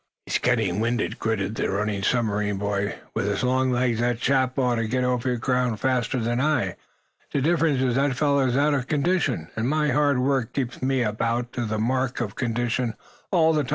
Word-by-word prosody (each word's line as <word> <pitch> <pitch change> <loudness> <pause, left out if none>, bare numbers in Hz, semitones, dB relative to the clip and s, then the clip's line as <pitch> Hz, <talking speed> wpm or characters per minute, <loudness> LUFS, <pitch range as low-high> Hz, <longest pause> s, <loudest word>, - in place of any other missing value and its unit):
"He's - - 0
getting 90 +3 +1
winded," 115 0 -1
gritted 110 -2 -1
the - - -1
running 100 +1 -1
submarine 105 -2 0
boy. 100 0 -1 0.2
"With 100 - -1
his 100 +5 -1
long 130 +1 +2
legs 120 -2 +1
that 120 -1 0
chap 130 0 +1
ought 125 -3 +2
to 115 -1 -1
get 125 +3 0
over 125 0 0
ground 125 -2 0
faster 130 +1 0
than 120 +2 0
I. 130 - +1 0.6
The - - 0
difference 150 -2 +2
is 125 -2 +1
that 135 +3 +2
that 135 - -2
fellow 140 0 +2
is 125 +1 0
out 145 +1 +3
of 135 -3 -1
condition, 150 - 0
and 115 +3 -1
my 150 0 +1
hard 145 0 +2
work 130 -2 0
keeps 125 -3 -3
me 130 -1 +1
about 115 +2 0
up 120 0 -6
to 120 - -3
the 110 0 -2
mark 130 +3 0
of 110 -5 -3
condition 120 -1 -1 0.3
all 160 -4 +4
the 155 - +2
time. - - -9
125 Hz, 210 wpm, -24 LUFS, 115-135 Hz, 0.6 s, all